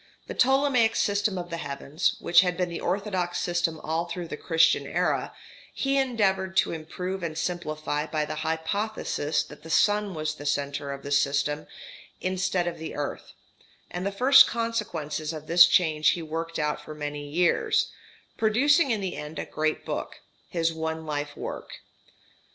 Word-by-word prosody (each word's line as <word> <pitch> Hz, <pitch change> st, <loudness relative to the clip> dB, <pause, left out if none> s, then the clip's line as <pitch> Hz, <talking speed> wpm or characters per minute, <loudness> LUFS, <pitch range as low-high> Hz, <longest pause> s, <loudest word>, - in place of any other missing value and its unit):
The -, -, -6 dB
Ptolemaic 265 Hz, -3 st, +3 dB
system 205 Hz, -1 st, +1 dB
of 175 Hz, -1 st, -5 dB
the 165 Hz, -, -2 dB
heavens, 140 Hz, 0 st, -1 dB
which 170 Hz, +1 st, +6 dB
had 180 Hz, -1 st, -1 dB
been 180 Hz, -1 st, 0 dB
the 170 Hz, -, -5 dB
orthodox 185 Hz, -2 st, -1 dB
system 170 Hz, -2 st, 0 dB
all 160 Hz, +2 st, -1 dB
through 170 Hz, -1 st, -6 dB
the -, -, -4 dB
Christian 165 Hz, +1 st, +3 dB
era, -, -, 0 dB, 0.4 s
he 275 Hz, 0 st, +1 dB
endeavoured 195 Hz, -7 st, +1 dB
to -, -, +3 dB
improve 180 Hz, +4 st, -5 dB
and 160 Hz, -2 st, -4 dB
simplify 155 Hz, -3 st, -2 dB
by 155 Hz, -1 st, -1 dB
the 155 Hz, 0 st, -5 dB
hypothesis 160 Hz, 0 st, -1 dB
that -, -, -13 dB
the 160 Hz, -, -11 dB
sun 205 Hz, +2 st, +2 dB
was 155 Hz, 0 st, -2 dB
the 145 Hz, -1 st, -10 dB
centre 140 Hz, 0 st, -1 dB
of 140 Hz, 0 st, -7 dB
the 140 Hz, -, -6 dB
system 145 Hz, +1 st, +1 dB, 0.5 s
instead 185 Hz, -1 st, 0 dB
of 175 Hz, -2 st, -4 dB
the 160 Hz, -, -6 dB
earth; 145 Hz, -1 st, -5 dB, 0.6 s
and 175 Hz, +1 st, -4 dB
the 200 Hz, -, -1 dB
first 260 Hz, +7 st, +7 dB
consequences 175 Hz, -10 st, -2 dB
of 155 Hz, -1 st, -7 dB
this 170 Hz, +2 st, +8 dB
change 155 Hz, -5 st, +3 dB
he 170 Hz, -, 0 dB
worked 165 Hz, +1 st, -4 dB
out 150 Hz, -1 st, -1 dB
for 155 Hz, -, -9 dB
many 145 Hz, -1 st, -5 dB
years, 175 Hz, +4 st, +2 dB, 0.5 s
producing 275 Hz, +8 st, +4 dB
in 220 Hz, -4 st, 0 dB
the 190 Hz, -2 st, -3 dB
end 150 Hz, +1 st, -7 dB
a -, -, -3 dB
great 155 Hz, 0 st, -2 dB
book: -, -, -4 dB, 0.3 s
his 165 Hz, -1 st, 0 dB
one 160 Hz, 0 st, -3 dB
life 145 Hz, -1 st, -4 dB
work. -, -, -6 dB
170 Hz, 170 wpm, -27 LUFS, 155-190 Hz, 0.6 s, this